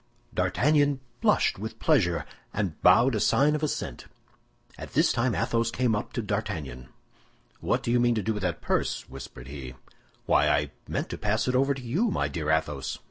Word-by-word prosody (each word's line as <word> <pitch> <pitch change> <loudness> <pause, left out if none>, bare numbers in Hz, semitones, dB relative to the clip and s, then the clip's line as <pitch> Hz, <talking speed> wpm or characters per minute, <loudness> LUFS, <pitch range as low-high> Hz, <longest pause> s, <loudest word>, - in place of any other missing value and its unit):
D'Artagnan 145 -1 +2 0.2
blushed - - +2
with 110 +2 -6
pleasure, 90 - +2 0.3
and 100 -6 -2
bowed 120 +8 +6
a 110 - 0
sign 145 +8 +3
of 150 - -1
assent. 155 - -3 0.7
At - - -9
this - - +3
time 120 0 +1
Athos 115 -1 +1
came 120 -1 +1
up 105 - -4
to 120 - -2
D'Artagnan. 80 - -4 0.7
"What - - 0
do 120 - -1
you 120 - +3
mean 120 -1 +3
to 110 - -1
do 110 - 0
with 105 - -4
that 90 -4 -2
purse?" - - -1
whispered 65 -1 -10
he. 65 -2 -8 0.5
"Why, - - +4
I - - +1 0.2
meant - - -3
to - - -6
pass 110 +3 0
it 125 - +1
over 135 +2 +3
to 130 - -8
you, 170 - +1
my - - 0
dear 80 -3 -3
Athos." 75 -3 0
110 Hz, 190 wpm, -27 LUFS, 85-130 Hz, 0.7 s, bowed